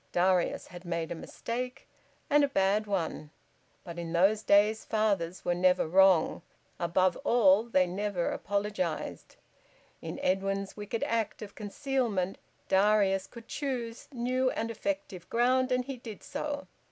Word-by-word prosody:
Darius 180 0 +2
had 175 0 -11
made 170 -2 -3
a - - 0
mistake, 245 +9 -5 0.4
and 295 0 +4
a - - +4
bad 210 -3 +1
one; 165 -6 -2 0.5
but 170 -1 -7
in 170 -1 -5
those 195 +5 +4
days 210 +1 +4
fathers 200 -5 0
were 175 - +2
never 180 -1 +3
wrong; 190 -1 +4 0.4
above 180 +1 +2
all 210 -4 +4
they 185 -6 +3
never 185 0 -2
apologised. 200 -5 -3 0.7
In - - -6
Edwin's 195 +1 0
wicked 210 +2 -4
act 225 -2 -1
of 205 - -9
concealment 215 -4 -2 0.3
Darius 195 -1 +3
could 230 -1 -12
choose 245 -5 -4
new 255 +1 0
and 230 -2 -2
effective 195 -4 -4
ground, 255 +2 +2
and 250 0 +1
he 270 -1 -5
did 225 -4 -9
so. 290 0 -4
200 Hz, 140 wpm, -30 LUFS, 185-235 Hz, 0.7 s, and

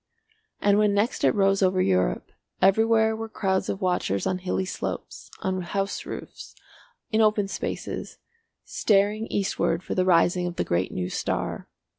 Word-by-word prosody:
And 205 0 +4
when 210 -1 +3
next 210 +4 0
it - - +4
rose 195 -1 +3
over 185 -1 +3
Europe 90 - +1 0.3
everywhere 220 +3 +4
were 225 0 -6
crowds 190 -3 -1
of 195 - -3
watchers 180 - 0
on 185 - 0
hilly 185 +1 -2
slopes, - - -6
on 185 -1 -1
house 195 +3 -3
roofs, - - -8 0.6
in 220 0 +3
open 210 -2 +3
spaces, 195 - -5 0.5
staring 210 +2 +1
eastward 190 -3 -1
for - - -4
the 185 - +2
rising 180 0 +3
of 175 - -5
the - - 0
great 85 +2 -1
new 90 0 -3
star. - - -3
195 Hz, 155 wpm, -25 LUFS, 180-210 Hz, 0.6 s, And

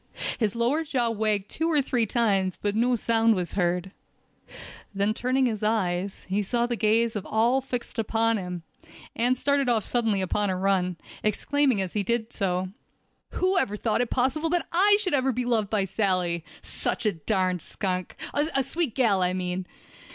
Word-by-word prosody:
His 215 -3 0
lower 245 +7 +1
jaw 250 -6 0
wagged 210 -2 0
two 325 +1 -1
or 310 -3 +3
three 245 -4 +1
times, 195 -5 +1
but 205 -1 -1
no 245 +3 +2
sound 225 0 +2
was 180 -2 -3
heard. 180 0 -1 1.0
Then 200 +2 +1
turning 255 +3 +1
his 220 -4 -1
eyes, 195 -3 -1
he 195 +2 0
saw 235 +4 0
the 240 0 -1
gaze 225 +1 +2
of 205 - -3
all 235 +5 +2
fixed 250 -3 -4
upon 225 +1 +1
him, 180 -3 -5 0.5
and 245 +2 +2
started 280 0 +1
off 225 -4 +1
suddenly 225 -5 +1
upon 195 +2 0
a 185 - -1
run, 185 -2 +1 0.2
exclaiming 260 +3 +1
as 185 -2 -4
he 210 - 0
did 235 +3 -1
so: 185 -2 -1 0.6
"Who 370 +1 +2
ever 210 +1 -1
thought 220 +2 0
it 245 - -1
possible 275 +6 0
that 345 0 0
I 405 +4 +5
should 375 -5 -1
ever 265 -1 +2
be 250 0 -2
loved 225 -4 +1
by 205 -3 +1
Sally—such 180 -3 -2
a 215 - +4
darn 185 +1 0
skunk—a 205 - -2
sweet 285 -2 -2
gal, 220 -8 +3
I 180 0 +1
mean!" 180 0 -3
220 Hz, 175 wpm, -26 LUFS, 190-250 Hz, 1.0 s, I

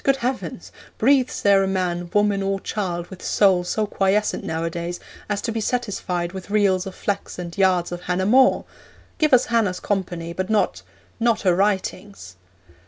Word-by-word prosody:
Good 275 - +3
heavens! 255 +1 -4 0.3
Breathes 260 +1 +2
there 200 -1 +5
a 195 - +1
man, 175 -2 -2
woman, 205 -1 +2
or 195 0 -1
child 180 -4 -3
with 190 - -10
soul 190 -3 +3
so 215 +4 -1
quiescent 200 +1 0
nowadays 170 +2 -3 0.3
as 205 -1 -1
to - - -1
be 225 0 -2
satisfied 195 -7 -2
with 190 0 -8
reels 200 -2 +2
of 190 - -8
flax 200 -1 -3
and 175 -1 -6
yards 185 -3 +2
of 175 0 -5
Hannah 180 +1 -1
More? 255 +5 +4 0.5
Give 310 -1 +3
us 255 -1 +5
Hannah's 205 -6 +2
company, 175 -4 -3
but 185 +3 -3
not 215 -1 +1 0.4
not 235 -1 +2
her 185 -3 +3
writings!' 195 - -2
195 Hz, 170 wpm, -22 LUFS, 180-210 Hz, 0.5 s, there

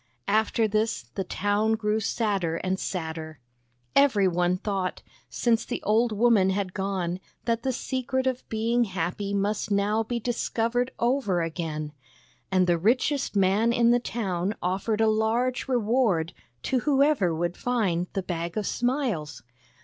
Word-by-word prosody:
After 220 +1 +2
this 215 - 0
the 195 - -2
town 205 +4 0
grew 215 -1 0
sadder 200 -6 -1
and 185 +2 -2
sadder. 160 -3 -4 0.6
Every 240 -9 +5
one 180 0 +1
thought, 195 -2 -3 0.3
since 230 -2 +1
the - - -4
old 225 +2 +2
woman 215 -3 +4
had 190 -1 -1
gone, 190 -2 -2 0.3
that 230 -1 0
the 260 - 0
secret 260 +1 -2
of 260 -1 -2
being 230 +2 +1
happy 190 +1 -3
must 200 +2 -1
now 205 +2 +2
be 235 +2 -2
discovered 240 +1 -1
over 235 -8 +1
again; 155 -2 -4 0.6
and 185 -1 +4
the 175 -1 +2
richest 255 - +1
man 200 +4 +3
in 235 0 +4
the 245 - +4
town 195 -5 -2
offered 195 +5 -1
a 220 - +4
large 225 +5 +1
reward 225 -9 +1 0.3
to 260 - +1
whoever 275 - +3
would 175 +2 -1
find 195 -8 0
the 195 - -2
Bag 170 +1 -4
of 210 - -1
Smiles. 225 - -1
210 Hz, 145 wpm, -26 LUFS, 185-235 Hz, 0.6 s, Every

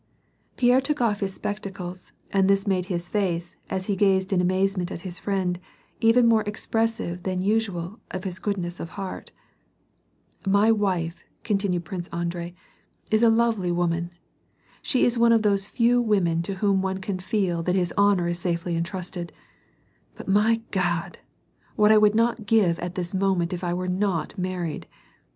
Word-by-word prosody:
Pierre 250 +1 +4
took 295 +2 -1
off 220 -4 +1
his 195 -2 -3
spectacles, 190 -3 -6 0.2
and 195 -1 +3
this 195 0 +3
made 185 -3 +1
his 175 -2 -3
face, 175 -4 -1
as 190 -1 -2
he 200 - 0
gazed 190 -1 +2
in 180 - +3
amazement 185 0 +1
at - - -5
his 180 -1 -7
friend, 185 -3 -1 0.4
even 230 +2 +5
more 225 -1 +5
expressive 225 -4 -1
than 185 0 -2
usual 205 -2 -1
of 185 0 -5
his 185 -2 -5
goodness 180 -4 -3
of 165 - -5
heart. 195 -2 -6 0.6
" - - -32
My 220 +2 +5
wife," 185 -6 -1 0.2
continued 195 -5 0
Prince 175 0 -5
Andrei, 170 0 -4 0.3
" - - -36
is 215 0 +4
a 235 - +6
lovely 225 -5 +2
woman. 170 -1 0 0.7
She 255 - +2
is 240 0 +1
one 235 0 +5
of 225 -1 +4
those 200 -1 +1
few 245 +1 +3
women 185 -7 +2
to 195 - -2
whom 195 -1 +2
one 190 0 -1
can 190 0 -4
feel 180 -3 0
tha,t 180 +2 0
his 175 -2 0
honor 200 -3 +3
is 175 0 -2
safely 170 -1 -2
entrusted; 175 0 -4 0.8
but, - - -10
my 215 +3 +3
God! 175 -3 -1 0.6
what 210 -1 +5
would 210 -1 +6
I - - -5
not 230 -2 +1
give 200 -6 +3
at 175 +1 -5
this 175 0 -3
moment 190 -2 +1
if 180 +1 -5
I 175 0 -1
were 185 +1 -3
not 185 -1 -1
married 180 -4 -3
190 Hz, 175 wpm, -25 LUFS, 175-210 Hz, 0.8 s, a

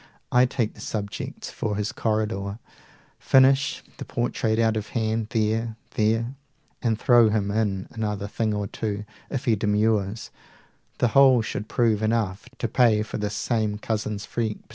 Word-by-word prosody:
I 125 +1 +5
take 120 -4 -1
the - - -13
subjects 100 -2 -5
for 105 -2 -2
his 105 +1 -2
corridor, 105 -2 -1 0.6
235 - - -24
Finish 135 +1 +4
the - - -6
portrait 115 -2 -1
out 115 -1 +2
of 110 -1 -3
hand 110 -1 0
there, 110 +1 0 0.2
there, 115 +3 +1 0.5
And 115 -3 +1
throw 120 -1 +5
him 105 -2 0
in 100 -3 0
another 105 -3 -3
thing 110 +1 -1
or 105 -1 -1
two 105 0 -4 0.2
If 135 -2 -3
he 115 -4 +4
demurs; 105 0 0 0.7
the 120 - +2
whole 130 -2 +6
should 105 - -4
prove 115 -3 +2
enough 110 -1 -1
To 120 - -1
pay 110 -2 +3
for 110 - -5
this 105 0 -2
same 110 -2 0
Cousin's 105 -1 -3
freak. 110 -3 -2
110 Hz, 160 wpm, -25 LUFS, 105-115 Hz, 0.7 s, whole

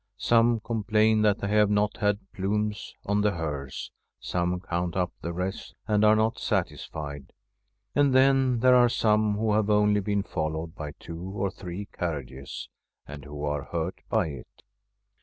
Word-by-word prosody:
Some 115 -1 +3
complain 110 -1 +2
that 105 -1 +2
they 100 - -1
have 105 0 +4
not 105 0 +1
had 105 -1 +2
plumes 105 +1 -2
on 100 +1 +1
the 105 -1 +2
hearse; 75 -5 -4 0.3
some 90 0 -1
count 90 -1 -3
up 90 -1 0
the 85 - -3
wreaths, 95 +2 -4
and 105 -1 +2
are 105 0 +6
not 110 +1 +1
satisfied; 70 -2 -3 0.6
and 145 -1 +3
then 130 -2 +4
there 130 0 +6
are 125 -1 +6
some 105 -2 +2
who 110 0 +1
have 105 0 +2
only 105 0 +4
been 100 0 0
followed 80 -1 -3
by 75 -4 -6
two 85 +2 -9
or 95 +1 -3
three 95 +2 -7
carriages, 70 -6 -5 0.4
and 70 0 -9
who 75 0 -5
are 75 -1 -2
hurt 85 +1 -3
by - - +1
it. 70 -4 -11
100 Hz, 160 wpm, -27 LUFS, 85-105 Hz, 0.6 s, are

